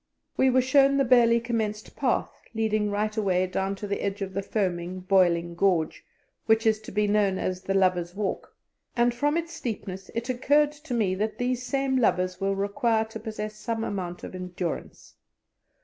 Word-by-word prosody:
We 265 - +4
were 255 0 +3
shown 275 +1 +4
the 275 - +3
barely 235 -2 +5
commenced 220 -3 -3
path - - 0 0.2
leading 215 -1 +1
right 210 +1 -1
away 185 -4 +1
down 190 +1 -2
to 205 +1 -6
the 200 - -2
edge 200 0 -2
of 190 -1 -6
the 195 - -1
foaming, 185 -3 -2
boiling 175 -2 +2
gorge, 175 -3 +1 0.4
which 220 +1 +3
is 220 -1 +3
to 215 - -10
be 210 +1 +1
known 205 -2 +2
as 185 0 -2
"The 195 - -2
Lovers' 180 -2 +1
Walk," 205 -1 -3 0.4
and 240 0 +3
from 290 +6 +1
its 335 0 -3
steepness 195 - -5
it 230 +1 -2
occurred 285 +4 +3
to 295 -4 -6
me 205 -5 +1
that 215 +3 -2
these 250 0 -1
same 270 +1 0
lovers 185 -6 +1
will 195 0 +1
require 220 +3 +1
to 220 - -8
possess 215 -1 -5
some 225 -1 -3
amount 180 -5 -4
of - - -7
endurance. 180 -2 -5
210 Hz, 180 wpm, -26 LUFS, 190-240 Hz, 0.4 s, barely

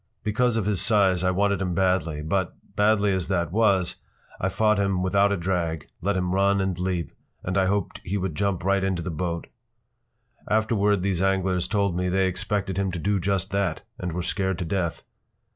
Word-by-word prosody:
Because 115 +2 +1
of 110 - 0
his 100 -4 0
size 95 -5 +3
I 95 - +3
wanted 100 +1 +1
him 90 -2 -1
badly, 85 -5 +1
but, 90 +2 -1 0.2
badly 105 -1 +3
as 95 -2 -1
that 85 -3 0
was, 100 -4 +2 0.4
I 95 - 0
fought 105 +1 +2
him 95 -2 +1
without 100 +2 +3
a 100 - +1
drag, 85 -4 -2
let 100 +1 0
him 90 0 -1
run 100 +1 +3
and 95 -1 0
leap, 90 -2 -2 0.3
and 95 - -2
I 95 -1 +3
hoped 100 -1 -1
he 100 +3 -2
would 95 -3 -2
jump 100 +1 -1
right 95 +1 +2
into 95 -3 -1
that 90 - -3
boat. 85 +1 -3 1.0
Afterward 105 -3 +2
these 95 -2 0
anglers 95 -2 +1
told 100 -4 0
me 90 +1 0
they 95 +1 +2
expected 95 +1 -2
him 95 -1 0
to - - -2
do 100 +4 0
just 95 0 -1
that 95 -4 -1 0.2
and 90 -1 -3
were 90 +1 -2
scared 95 -1 -1
to 85 - -3
death. 85 -1 -2
95 Hz, 195 wpm, -25 LUFS, 90-100 Hz, 1.0 s, size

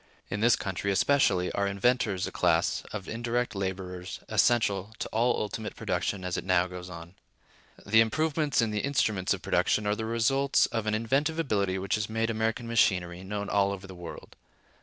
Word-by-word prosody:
In 105 - -2
this 120 +2 +5
country, 100 -1 -2
especially, 95 -4 +2
are 100 0 0
inventors 100 -1 +1
a - - -5
class 85 -1 +1
of 100 -3 -6
indirect 120 +2 -2
laborers 95 -2 -4
essential 110 -3 +2
to - - -4
all 120 +2 +1
ultimate 105 +1 -4
production 95 -2 -2
as 90 - -2
it - - -3
now 90 -1 +3
goes 90 0 -8
on. 85 0 -10 0.7
The 110 +2 +5
improvements 150 +2 +1
in 110 - -1
the 105 - -1
instruments 110 -9 0
of 95 -2 0
production 100 +3 +1
are 105 0 +1
the 110 - -4
results 130 +5 +2
of 115 -2 -3
an 110 - +1
inventive 135 +8 0
ability 100 - 0
which 95 +1 -3
has 105 0 0
made 110 +1 0
American 110 +1 -1
machinery 90 -6 +1
known 100 +1 -4
all 100 -1 +2
over 100 -1 -6
the 95 - -10
world. 90 -2 -10
105 Hz, 180 wpm, -28 LUFS, 95-115 Hz, 0.7 s, this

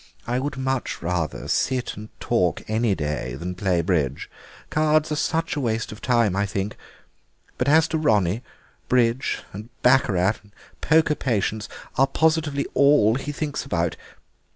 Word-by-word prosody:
I 120 +1 0
would 135 0 -3
much 130 -1 -2
rather 85 -3 -2
sit 130 -2 0
and 110 +1 -9
talk - - 0
any 110 -1 +1
day 75 -5 -3
than 90 +6 -5
play 90 -2 +1
bridge; 75 -7 -1 0.4
cards 155 0 +2
are - - +1
such 165 +2 -1
a - - -1
waste 115 -3 -1
of 105 - -10
time, 115 -6 +2
I 100 +1 +1
think. 100 +1 -3 0.8
But 125 - 0
as 160 +1 +5
to 160 - 0
Ronnie, 105 - +2 0.5
bridge 125 0 +1
and 105 +4 -8
baccarat 105 -6 +3
and 105 -1 -23 0.3
poker 160 0 +4
patience 110 -6 -1 0.3
are 135 - +5
positively 155 -1 +1
all 140 -6 +5
that 130 - -2
he 145 - -2
thinks 145 -3 -3
about. 85 - -1
115 Hz, 155 wpm, -23 LUFS, 95-140 Hz, 0.8 s, as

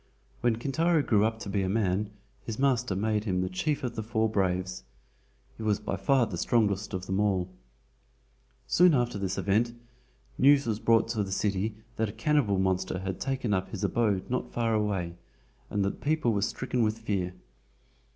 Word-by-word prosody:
When 120 -2 +2
Kintaro 155 +6 +1
grew 105 -5 +3
up 110 +1 +1
to 100 - -6
be 100 0 0
a 95 - -1
man 100 -1 0 0.3
his 110 -2 -5
master 125 -6 +1
made 105 +1 0
him 90 -3 0
the 90 - -1
Chief 145 +10 -1
of 125 -2 -2
the 110 - -3
Four 110 0 0
Braves. 95 - -1 0.7
He - - -9
was 105 -2 +1
by 105 -2 -3
far 120 +7 +3
the 90 -6 -5
strongest 105 -4 +1
of 95 0 -4
them 95 +1 -1
all. 95 -4 +1 1.2
Soon 175 -3 +5
after 120 -4 0
this 95 -1 -2
event, 115 +4 +1 0.6
news 140 +1 +6
was 110 -2 -1
brought 115 0 +3
to 110 -3 0
the 95 - -6
city 100 +2 -1 0.2
that 110 -1 0
a - - -8
cannibal 145 -10 +2
monster 95 0 0
had 95 0 -4
taken 130 -5 -1
up 95 -1 -1
his 105 - -5
abode 105 -5 +1
not 125 0 -2
far 115 -1 0
away 95 -5 -1 0.5
and 100 -1 0
that 100 - -3
people 150 -6 +1
were 100 - 0
stricken 125 +4 -1
with 110 0 +1
fear. 95 -5 -2
105 Hz, 185 wpm, -28 LUFS, 95-120 Hz, 1.2 s, news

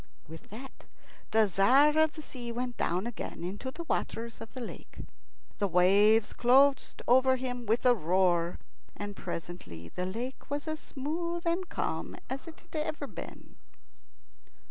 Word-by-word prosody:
With 160 +1 -11
that 250 +6 -10 0.4
the 220 0 +5
Tzar 255 - +5
of 315 -1 +4
the 310 - -9
Sea 245 -4 -6
went 245 +1 -3
down 180 +4 0
again 235 -7 -5
into 200 +9 -4
the 335 +6 -7
waters 230 -7 -3
of 225 - -8
the - - -5
lake. 240 - -8 0.6
The 200 - +2
waves 200 +5 +5
closed 270 +3 +4
over 260 +2 +5
him 245 -2 -4
with 225 +4 +1
a 250 - +7
roar, 175 -3 +2 0.4
and 205 0 -5
presently 125 - -7
the 180 - -3
lake 240 +7 -5
was 290 +2 -3
as 310 0 -2
smooth 335 +6 -3
and 345 +2 0
calm - - -3 0.2
as 270 +5 -4
it 325 - -11
had 325 -2 -4
ever 305 -1 -3
been. - - -10
245 Hz, 155 wpm, -30 LUFS, 195-285 Hz, 0.6 s, a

